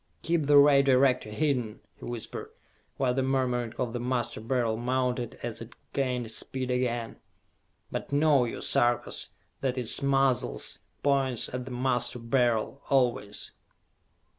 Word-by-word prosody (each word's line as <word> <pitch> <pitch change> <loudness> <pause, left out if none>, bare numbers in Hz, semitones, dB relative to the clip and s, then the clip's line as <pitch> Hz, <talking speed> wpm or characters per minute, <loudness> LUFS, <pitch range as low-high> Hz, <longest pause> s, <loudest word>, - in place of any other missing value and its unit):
"I - - -22
keep 165 -3 +1
the 145 0 +7
Ray 140 -1 +7
Director 130 -4 +3
hidden," 125 -3 -1 0.2
he - - -11
whispered, 120 -2 -6 0.5
while 130 -2 +1
the 135 - 0
murmuring 125 -3 0
of 120 -2 -2
the 120 - -2
Master 120 -2 -2
Beryl 115 -1 0
mounted 125 0 -1
as - - -4
it - - -10 0.2
gained 125 -4 -1
speed 130 +2 -3
again, 120 -2 -1 0.7
"but - - -4
know 145 -3 +4
you, 115 - -5
Sarkas, 120 0 +1 0.3
that 130 -1 -1
its 125 -3 +1
muzzle 135 - +2 0.4
points 135 -5 +1
at 125 0 -3
the 130 - -8
Master 125 -1 0
Beryl, 120 +1 0
always!" 125 -6 +1
125 Hz, 140 wpm, -28 LUFS, 120-135 Hz, 0.7 s, the